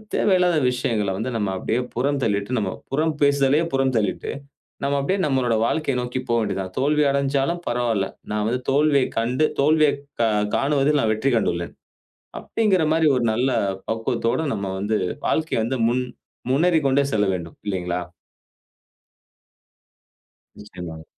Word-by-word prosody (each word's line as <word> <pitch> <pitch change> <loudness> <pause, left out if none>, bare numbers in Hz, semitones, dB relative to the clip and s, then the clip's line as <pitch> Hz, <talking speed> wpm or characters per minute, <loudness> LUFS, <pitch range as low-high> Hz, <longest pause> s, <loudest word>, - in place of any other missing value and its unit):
தேவையில்லாத 180 -4 +3
விஷயங்கள்ல 110 -5 -1
வந்து 120 +5 -3
நம்ப 105 -3 -1
அப்படியே 115 +6 -1
புறம் 140 +4 0
தள்ளிட்டு, 100 +2 -1
நம்ம 95 -3 -2 0.2
புறம் 155 +3 +1
பேசுதலையே 140 +2 +3
புறம் 135 -1 +1
தள்ளிட்டு, 105 -3 -1 0.5
நம்ப 140 +1 +1
அப்படியே 185 +8 0
நம்முடைய 130 -5 +1
வாழ்க்கையை 155 -4 -1
நோக்கி 125 +1 -3
போக 115 - +3
வேண்டியது 100 -3 -2
தான். 95 -1 -6
"தோல்வி 150 +3 +2
அடைந்தாலும் 140 +3 0
பரவாயில்ல. 120 -5 0 0.3
நான் 105 0 0
வந்து 125 +1 -1
தோல்வியைக் 140 -1 +3
கண்டு 125 +6 +1 0.2
தோல்வியைக் 150 -1 +3 0.6
காணுவதில் 145 +1 +2
நான் 110 - +1
வெற்றி 110 +6 0
கண்டுள்ளேன்." 85 -6 -1 0.7
அப்டீன்ற 195 -7 +1
மாரி 160 0 +3
ஒரு 125 - 0
நல்ல 125 +4 +1 0.4
பக்குவத்தோடு 115 +5 -1
நம்ம 100 -2 -3
வந்து 105 +2 0 0.3
வாழ்க்கைய 160 -8 0
வந்து 130 +3 -2
முன் 125 +2 0 0.5
முன்னேறிக் 160 +1 +3
கொண்டே 135 +1 +3
செல்ல 105 -1 +2
வேண்டும். 85 -2 -7
இல்லங்களா? 90 -2 -2 2.6
நிச்சயமாங்க. 90 -6 -9
130 Hz, 135 wpm, -22 LUFS, 110-145 Hz, 2.6 s, தேவையில்லாத